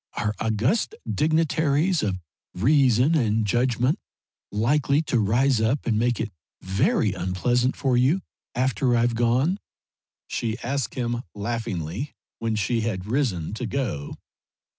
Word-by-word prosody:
"Are 105 Hz, 0 st, 0 dB
august 115 Hz, -, 0 dB
dignitaries 160 Hz, +2 st, +2 dB
of 95 Hz, -3 st, -1 dB, 0.4 s
reason 130 Hz, -, +4 dB
and 110 Hz, -7 st, +2 dB
judgment 125 Hz, -, +1 dB, 0.5 s
likely 140 Hz, +7 st, +2 dB
to 125 Hz, -, +1 dB
rise 120 Hz, +4 st, +2 dB
up 115 Hz, +6 st, +1 dB
and 110 Hz, -2 st, +1 dB
make 120 Hz, 0 st, +1 dB
it 110 Hz, -2 st, -2 dB, 0.3 s
very 95 Hz, +2 st, +1 dB
unpleasant 110 Hz, +8 st, 0 dB
for 135 Hz, -3 st, +1 dB
you 135 Hz, +10 st, +3 dB, 0.3 s
after 125 Hz, 0 st, +2 dB
I've 120 Hz, +1 st, +2 dB
gone?" 125 Hz, -, +2 dB, 0.7 s
she 115 Hz, -1 st, -2 dB
asked 135 Hz, +1 st, -2 dB
him, 120 Hz, -1 st, -1 dB
laughingly, 105 Hz, -, -3 dB, 0.2 s
when 115 Hz, -1 st, -1 dB
she 115 Hz, +3 st, 0 dB
had 100 Hz, -5 st, -2 dB
risen 105 Hz, -, -1 dB
to 115 Hz, +2 st, -3 dB
go. 100 Hz, -, -3 dB
120 Hz, 125 wpm, -25 LUFS, 110-135 Hz, 0.7 s, reason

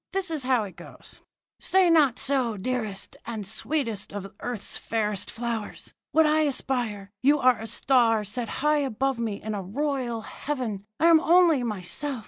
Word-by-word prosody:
This 380 Hz, -3 st, 0 dB
is 310 Hz, -3 st, -1 dB
how 255 Hz, -3 st, +2 dB
it 190 Hz, -3 st, -9 dB
goes: 175 Hz, -, -12 dB, 0.4 s
"'Say 380 Hz, -1 st, +4 dB
not 290 Hz, -7 st, +4 dB
so, 255 Hz, -6 st, 0 dB
dearest 215 Hz, -2 st, -3 dB
and 220 Hz, -3 st, -4 dB
sweetest 225 Hz, 0 st, -2 dB
of 195 Hz, -1 st, -7 dB
earth's 245 Hz, -4 st, -2 dB
fairest 210 Hz, -3 st, -1 dB
flowers. 230 Hz, -2 st, -5 dB, 0.2 s
Would 320 Hz, 0 st, +5 dB
I 305 Hz, +1 st, +3 dB
aspire? 245 Hz, -9 st, -1 dB
You 285 Hz, +3 st, +4 dB
are 255 Hz, -4 st, +4 dB
a 225 Hz, -, -6 dB
star 230 Hz, -1 st, +3 dB
set 235 Hz, +3 st, -4 dB, 0.2 s
high 300 Hz, 0 st, +4 dB
above 270 Hz, -1 st, -1 dB
me 220 Hz, -4 st, -2 dB
in 215 Hz, 0 st, -3 dB
a 205 Hz, -, -3 dB
royal 245 Hz, +2 st, -2 dB
heaven; 230 Hz, -8 st, -4 dB
I 320 Hz, -, +3 dB
am 335 Hz, -1 st, +7 dB
only 335 Hz, -3 st, +5 dB
myself. 235 Hz, +5 st, -3 dB
245 Hz, 165 wpm, -26 LUFS, 215-285 Hz, 0.4 s, am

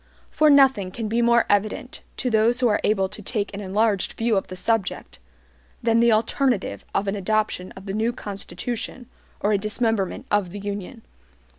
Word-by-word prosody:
For 310 Hz, 0 st, +4 dB
nothing 265 Hz, -9 st, +5 dB
can 220 Hz, +4 st, -5 dB
be 230 Hz, +3 st, +1 dB
more 235 Hz, 0 st, +4 dB
evident, 210 Hz, +5 st, -1 dB, 0.2 s
to 250 Hz, -, -1 dB
those 225 Hz, +2 st, +3 dB
who 250 Hz, -, +3 dB
are 210 Hz, -, +1 dB
able 195 Hz, -2 st, +2 dB
to 210 Hz, -, -9 dB
take 210 Hz, -1 st, -3 dB
an 200 Hz, -, -5 dB
enlarged 205 Hz, 0 st, +1 dB
view 230 Hz, -1 st, 0 dB
of 195 Hz, -, 0 dB
the 185 Hz, -, -7 dB
subject, 200 Hz, -, -2 dB, 0.6 s
than 230 Hz, 0 st, +3 dB
the 235 Hz, 0 st, +5 dB
alternative 230 Hz, 0 st, 0 dB
of 200 Hz, -, +1 dB
an 195 Hz, -, 0 dB
adoption 205 Hz, -2 st, -1 dB
of 190 Hz, -, -12 dB
the 195 Hz, -, -4 dB
new 220 Hz, +3 st, +1 dB
Constitution 235 Hz, +4 st, -6 dB, 0.4 s
or 205 Hz, -, +2 dB
a 200 Hz, -, +2 dB
dismemberment 215 Hz, -2 st, -1 dB
of 205 Hz, -3 st, +2 dB
the 205 Hz, +4 st, -7 dB
Union. 205 Hz, +3 st, -6 dB
215 Hz, 180 wpm, -23 LUFS, 200-235 Hz, 0.6 s, nothing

